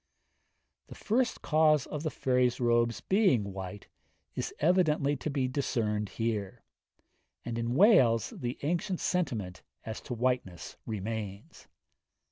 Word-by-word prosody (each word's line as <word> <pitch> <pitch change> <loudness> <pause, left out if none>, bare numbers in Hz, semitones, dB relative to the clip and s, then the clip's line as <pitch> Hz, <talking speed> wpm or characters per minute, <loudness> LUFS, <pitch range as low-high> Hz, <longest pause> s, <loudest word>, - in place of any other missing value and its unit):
The - - -11
first 240 +4 0
cause 155 -3 +3
of 150 - -5
the 155 - -1
fairies' 125 -3 +1
robes 120 -1 +2
being 175 - +2
white 95 +1 -7 0.5
is - - -3
evidently 155 -4 +2
to 155 - -4
be 135 -3 0
discerned 110 -6 -1
here; 110 -4 -3 0.8
and 120 - -3
in 115 +1 -2
Wales 135 - +5
the 120 0 -4
ancient 175 +4 -1
sentiment 115 - -2 0.2
as 110 0 -5
to 125 - -5
whiteness 120 -8 -2
remains. 105 -1 -6
125 Hz, 120 wpm, -30 LUFS, 110-155 Hz, 0.8 s, Wales